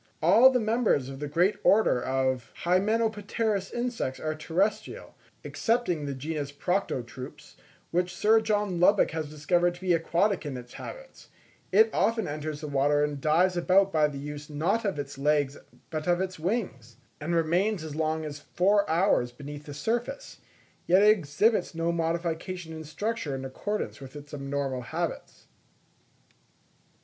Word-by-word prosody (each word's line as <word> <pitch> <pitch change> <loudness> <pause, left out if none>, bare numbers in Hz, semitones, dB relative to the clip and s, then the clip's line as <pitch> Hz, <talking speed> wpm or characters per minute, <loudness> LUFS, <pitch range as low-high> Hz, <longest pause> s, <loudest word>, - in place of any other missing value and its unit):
All 255 +3 +7
the 255 -1 +1
members 220 - +1
of 135 0 -8
the 150 - -3
great 175 +7 +2
order 200 - +4
of 130 -2 -1
Hymenopterous 210 +1 0
insects 240 - -3
are 155 0 -2
terrestrial, 175 +7 -2 0.3
excepting 225 - 0
the 140 - -3
genus 145 +1 -4
Proctotrupes, 130 -7 -4 0.4
which 180 +1 0
Sir 220 +1 +4
John 210 -4 0
Lubbock 195 +3 +4
has 160 -2 -4
discovered 175 +4 +1
to 175 - -15
be 185 -2 +2
aquatic 175 +4 +1
in 140 -4 -5
its 125 -1 -11
habits; - - -10 0.4
it 220 +4 +6
often 225 0 +1
enters 150 0 -5
the 155 - -5
water 145 +1 +2
and 145 -2 -2
dives 175 +5 +3
about 190 +3 +3
by 155 -2 +4
the 145 -2 -7
use 150 +1 -7
not 175 +10 0
of 195 -6 -1
its 140 -1 -6
legs 145 -1 +2 0.4
but 155 0 -4
of 175 0 +3
its 185 -2 -3
wings, 155 - -3 0.2
and 165 +3 -2
remains 175 +4 +1
as 155 -2 -6
long 160 0 -1
as 145 -1 -6
four 200 +6 +1
hours 160 -7 +2
beneath 145 +2 -9
the 145 - -6
surface; 240 - -3 0.5
yet 185 +3 +5
it 210 - +7
exhibits 185 +2 +1
no 165 +1 0
modification 170 +1 -2
in 160 0 -7
structure 160 -1 -3
in 135 0 -5
accordance 205 +7 -4
with 135 +1 -10
its 145 0 -11
abnormal 140 -2 -3
habits. 120 - -5
165 Hz, 155 wpm, -28 LUFS, 145-200 Hz, 0.5 s, All